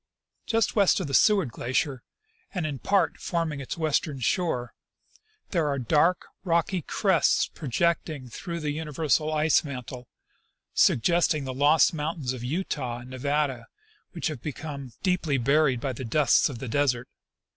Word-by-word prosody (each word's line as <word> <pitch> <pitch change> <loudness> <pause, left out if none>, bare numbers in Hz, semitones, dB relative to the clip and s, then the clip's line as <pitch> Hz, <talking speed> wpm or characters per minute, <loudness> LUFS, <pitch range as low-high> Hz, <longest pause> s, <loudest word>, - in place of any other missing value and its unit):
" - - -61
Just 225 -2 +1
west 200 -1 +4
of 185 - -2
the 140 - -6
Seward 195 - +4
glacier, 130 +2 -1 0.5
and 180 -4 -1
in 145 -4 -4
part 195 -4 +1
forming 165 -4 -2
its 140 - -5
west 155 -2 +1
ern 140 -3 -6
shore, 125 -2 -1 0.8
there 165 -5 +1
are 140 -1 0
dark, 155 +8 +2 0.2
rocky 170 +1 +1
crests 190 +2 +2
projecting 155 -1 -2
through 170 +7 -6
the 150 -1 -1
universal 155 0 0
ice 155 0 +3
mantle, 125 -3 -7 0.7
suggesting 160 +2 +3
the 130 -1 -4
lost 145 +4 +4
mountains 150 -4 -3
of 125 -2 -7
Utah 130 -4 -3
and 125 +1 -12
Nevada 135 -2 -1 0.5
which 170 - -5
have 150 -6 -2
become 145 -3 -6
deeply 180 -7 +1
buried 135 +1 +2
by 130 +2 -3
the 130 - -7
dusts 130 +4 +3
of 135 - -6
the 130 - -6
desert. 125 -1 0
150 Hz, 155 wpm, -26 LUFS, 130-165 Hz, 0.8 s, west